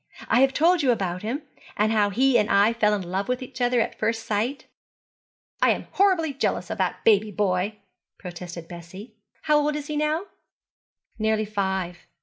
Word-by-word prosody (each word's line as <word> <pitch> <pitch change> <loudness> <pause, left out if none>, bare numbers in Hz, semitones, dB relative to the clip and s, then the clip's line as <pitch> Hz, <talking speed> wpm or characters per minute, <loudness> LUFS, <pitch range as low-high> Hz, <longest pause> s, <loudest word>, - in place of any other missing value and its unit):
I - - +3
have 265 +1 +5
told 335 +5 +3
you 270 - +1
about 185 -6 0
him, 250 +8 -3 0.3
and 215 +1 +2
how 210 -2 +3
he 255 +5 +2
and 210 - 0
I 200 +3 +4
fell 210 -2 +2
in 200 - -4
love 190 +3 -3
with 250 0 -1
each 255 0 -9
other 245 0 +2
at 225 - -2
first 225 +1 -1
sight.' 225 +7 -2 1.0
'I - - +5
am - - 0
horribly 370 -6 +2
jealous 275 - -2
of - - -5
that - - -1
baby 215 -1 +4
boy,' 200 0 -1 0.4
protested 175 -2 -8
Bessie. 185 +6 -10 0.3
'How 300 -1 +4
old 295 0 0
is 295 -1 -4
he 300 - -4
now?' 305 +4 0 0.9
'Nearly 220 0 +1
five. 190 -4 -2
220 Hz, 180 wpm, -25 LUFS, 195-270 Hz, 1.0 s, have